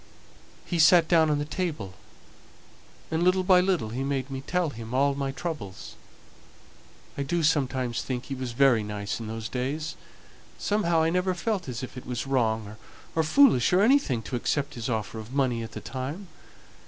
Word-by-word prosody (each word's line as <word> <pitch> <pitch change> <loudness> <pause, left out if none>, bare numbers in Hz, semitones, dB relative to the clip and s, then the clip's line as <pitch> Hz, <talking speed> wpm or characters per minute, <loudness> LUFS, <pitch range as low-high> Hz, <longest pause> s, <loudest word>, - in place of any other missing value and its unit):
He 175 - -2
sate 165 +1 +6
down 160 -2 +4
on 150 - +2
the 145 - -2
table, 150 - -3 1.2
and 160 +1 0
little 185 +1 +3
by 180 -1 +6
little 180 - 0
he 125 +4 -3
made 135 -1 -2
me 135 0 -4
tell 175 +1 -1
him 115 0 -7
all 140 +1 +3
my 135 -1 -2
troubles. 135 - -6 1.3
I - - +1
do 165 +5 -1
sometimes 130 -6 +1
think 125 -2 -4
he 140 - -5
was 130 -2 -4
very 130 -3 +4
nice 105 0 -4
in 115 - -6
those 110 0 -5
days. 140 +7 -3 0.6
Somehow 170 -6 +1
I 165 - +2
never 180 +1 +1
felt 190 - -2
as 120 0 -5
if 130 - -8
it 125 - -9
was 125 0 -3
wrong 110 -5 0 0.4
or 165 - +3
foolish 160 - +5
or 185 - +5
anything 215 - +3
to 125 - -5
accept 140 +4 -1
his 120 -2 -4
offer 110 -1 -3
of 110 +3 -9
money 130 -4 +1
at 115 - -7
the - - -6
time. 145 +9 -6
135 Hz, 180 wpm, -27 LUFS, 120-170 Hz, 1.3 s, sate